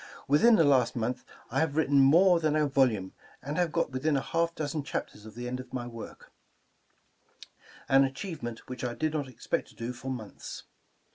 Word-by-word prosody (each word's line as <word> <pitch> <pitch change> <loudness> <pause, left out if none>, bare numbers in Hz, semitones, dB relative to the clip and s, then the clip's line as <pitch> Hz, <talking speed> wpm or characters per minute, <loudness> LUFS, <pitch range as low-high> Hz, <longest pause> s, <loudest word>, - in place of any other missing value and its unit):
Within 185 +12 +6
the 165 - +5
last 130 -5 +3
month 120 +2 -2 0.3
I 135 - +1
have 160 -2 0
written 145 -3 +3
more 170 +6 +6
than 155 -2 +1
a 155 -1 +3
volume, 125 -9 +1 0.3
and 145 +3 -5
have 175 -3 +1
got 165 -3 0
within 140 +3 0
a - - 0
half 165 +2 -1
dozen 150 0 -2
chapters 105 -5 -5
of 110 - -12
the 120 +1 -5
end 125 +1 -3
of 130 0 -9
my 125 -2 -3
work, 115 -2 -10 0.8
— - - -43 0.7
an 135 0 +6
achievement 135 - -5
which 130 -1 -7
I 120 -1 -2
did 155 -1 -1
not 145 -3 -2
expect 125 - -3
to - - -18
do 115 +2 -4
for 125 +2 -7
months. 115 -6 -7
135 Hz, 200 wpm, -29 LUFS, 125-155 Hz, 0.8 s, Within